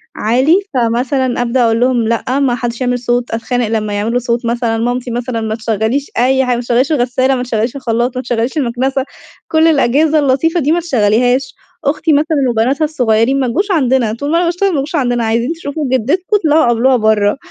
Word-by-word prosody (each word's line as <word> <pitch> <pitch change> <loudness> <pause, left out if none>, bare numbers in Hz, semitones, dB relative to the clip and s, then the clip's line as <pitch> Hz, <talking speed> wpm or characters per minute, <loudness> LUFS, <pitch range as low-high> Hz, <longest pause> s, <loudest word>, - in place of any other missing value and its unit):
عالي. 255 +9 +2 0.2
فمثلًا 245 +1 0
أبدأ 245 +1 +1
أقول 225 0 +2
لهم: 245 -2 +1
"لأ، 235 +4 -1
ما 260 -3 +1
حدش 240 +1 -4
يعمل 245 0 0
صوت." 245 0 -1
أتخانق 235 +1 -2
لما 215 -2 -2
يعملوا 225 +4 -1
صوت، 235 0 -2
مثلًا. 235 -1 -1
مامتي، 245 +2 -2
مثلًا، 240 -1 -3
ما 220 0 -2
تشغليش 225 +5 -2
أي 265 +2 +2
حاجة، 250 - +1
ما 240 - -3
تشغليش 245 +4 0
الغسالة، 260 -1 +1
ما 250 - -2
تشغليش 230 0 -2
الخلاط، 240 -1 -1
ما - - -1
تشغليش 240 +2 -2
المكنسة، 260 0 -1 0.4
كل 320 0 +3
الأجهزة 305 +1 +2
اللطيفة 295 +5 +1
دي 295 +1 0
ما 345 - +2
تشغليهاش. 250 -2 +1 0.3
أختي، 305 +2 +1
مثلًا، 305 +2 +1
وبناتها 245 +7 +1
الصغيرين، 250 -3 +1
ما 260 - 0
تجوش 390 - -1
عندنا، 260 - +1
طول 285 +6 -4
ما 335 - +2
أنا 350 - +1
باشتغل، 355 +4 0
ما 340 - -1
تجوش 300 +5 -4
عندنا. 245 -4 0
عايزين 230 +6 0
تشوفوا 310 -2 -5
جدتكم، 265 +9 0
اطلعوا 315 -4 +2
قابلوها 240 +2 +3
برّا. 215 0 +2
250 Hz, 190 wpm, -14 LUFS, 235-280 Hz, 0.4 s, كل